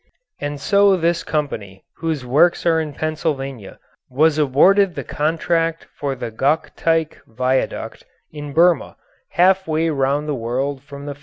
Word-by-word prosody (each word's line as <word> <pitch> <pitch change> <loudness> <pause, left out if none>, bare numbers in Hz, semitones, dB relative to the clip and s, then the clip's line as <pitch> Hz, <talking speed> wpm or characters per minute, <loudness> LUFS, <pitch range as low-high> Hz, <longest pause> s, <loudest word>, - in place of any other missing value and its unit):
And 145 0 -4
so 200 +3 +4
this 170 0 +1
company 105 -11 -4
whose 160 -6 -3
works 160 +10 +3
are 165 -1 +3
in 155 -2 -5
Pennsylvania 140 - -4 0.3
was 155 +4 +2
awarded 180 +7 +4
the - - -4
contract 165 +2 -1
for 140 -2 -3
the 120 -2 -6
Gokteik 160 +5 0
viaduct 130 +3 -2 0.3
in 145 -1 -7
Burma, 170 +3 +2 0.4
half 190 +1 +4
way 160 +1 0
round 140 +1 0
the 150 - -1
world 130 +3 -2
from 140 0 -10
the 145 - -4
factory. 140 - -21
150 Hz, 145 wpm, -20 LUFS, 135-165 Hz, 0.4 s, so